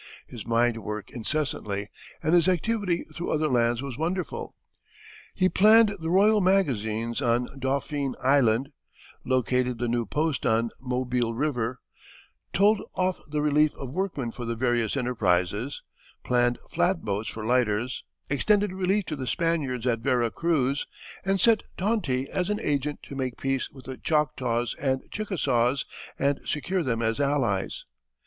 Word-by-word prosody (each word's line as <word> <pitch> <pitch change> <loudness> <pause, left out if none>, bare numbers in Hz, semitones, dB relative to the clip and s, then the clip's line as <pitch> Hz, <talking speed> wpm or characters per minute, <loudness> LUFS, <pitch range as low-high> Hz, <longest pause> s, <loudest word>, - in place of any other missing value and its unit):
His 115 -3 -9
mind 115 0 +2
worked 105 -1 -5
incessantly, 110 -6 -2 0.4
and 160 - +2
his 175 0 +5
activity 185 0 +1
through 175 - -4
other 155 -1 +1
hands 120 0 +2
was 135 -2 -6
wonderful. 175 0 -3 0.8
He 185 - +3
planned 215 +2 +6
the 160 0 -3
royal 205 +4 +5
magazines 120 - +1
on 120 -1 +2
Dauphine 140 +1 -1
Island, 130 -1 +3 0.5
located 125 -1 +1
the 120 +1 -1
new 120 -1 0
post 155 +1 -1
on 115 +1 +2
Mobile 125 -2 -1
River, 125 -3 -1 0.7
told 205 +2 +4
off 185 0 0
the 150 0 -1
relief 150 0 +3
of 130 -2 -7
workmen 155 -8 -2
for 125 - -7
the 115 0 -2
various 120 0 +1
enterprises, 115 -1 0 0.4
planned 120 0 +2
flat 180 -1 +1
boats 105 +1 -2
for 110 -1 -6
lighters, 120 0 +1 0.2
extended 205 +8 +2
relief 190 +2 +1
to 155 - -3
the 130 -3 -5
Spaniards 140 -5 0
at 120 -2 +1
Vera 120 -2 +1
Cruz, 140 -4 0 0.4
and 195 0 +1
sent 225 -1 +4 0.2
Tonti 180 - 0
as 185 +3 -2
an 210 0 0
agent 145 0 -1
to - - -9
make 130 -2 -3
peace 135 -1 -1
with 135 -2 -14
the 130 -1 -6
Choctaws 130 -7 0
and 130 -1 0
Chickasaws 140 - 0 0.3
and 140 +1 +1
secure 180 +5 -1
them 120 -6 -1
as 115 +2 0
allies. 135 -9 0
135 Hz, 145 wpm, -26 LUFS, 120-165 Hz, 0.8 s, planned